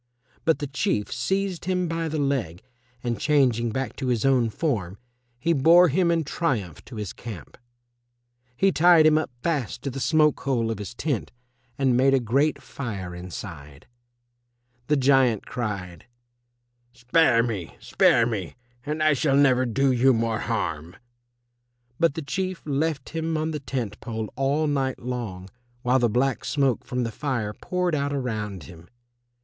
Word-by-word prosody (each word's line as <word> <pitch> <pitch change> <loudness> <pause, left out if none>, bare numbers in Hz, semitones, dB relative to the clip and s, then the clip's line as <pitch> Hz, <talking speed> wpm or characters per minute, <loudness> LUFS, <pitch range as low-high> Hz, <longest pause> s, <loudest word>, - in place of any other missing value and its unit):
But 160 -4 +3
the 145 - -4
Chief 135 -6 -1
seized 195 -2 -2
him 180 -1 0
by 165 0 -2
the 155 0 -3
leg, 130 - -1 0.4
and 120 -4 -2
changing 125 -6 +2
back 130 +4 -3
to 130 - -3
his 120 -2 0
own 130 -4 +3
form, 105 - -2 0.4
he 165 +8 +1
bore 165 +5 +6
him 175 +4 +2
in 165 -1 +2
triumph 120 - -2
to 125 - -11
his 105 -3 -5
camp. 105 - -9 1.0
He 195 0 +3
tied 170 -2 +6
him 155 0 +5
up 155 - -3
fast 140 -8 -2
to 140 - -2
the 135 - -5
smoke 150 +1 +3
hole 120 -5 0
of 110 - -4
his 105 +3 -7
tent 140 -7 -2 0.5
and 130 -3 +2
made 135 +2 +4
a - - +3
great 135 +6 +1
fire 100 -9 -6
inside. 85 -5 -9 1.0
The 150 - +3
giant 130 -5 +3
cried, 95 -8 -5 0.9
"Spare 125 -1 +3
me, 105 -8 -4
spare 115 - +3
me, 105 -7 -4 0.3
and 150 +2 -2
I 155 0 +5
shall 140 0 +2
never 130 -3 +4
do 135 +3 +2
you 130 +1 +4
more 115 0 0
harm." 85 -8 -3 1.0
But 165 -3 +3
the 160 - -4
Chief 185 +4 -3
left 145 -1 -1
him 160 -1 -2
on 155 +1 -1
the 150 - -3
tent 120 -7 -4
pole 110 -3 -5
all 140 +4 +1
night 135 -3 0
long 115 -7 -5 0.4
while 125 +2 +3
the 120 -2 +2
black 125 +4 0
smoke 135 -5 0
from 125 -2 -2
the 115 - -3
fire 120 -5 -2
poured 180 - -2
out 145 -1 0
around 105 - -3
him. 85 0 -13
130 Hz, 160 wpm, -25 LUFS, 110-150 Hz, 1.0 s, bore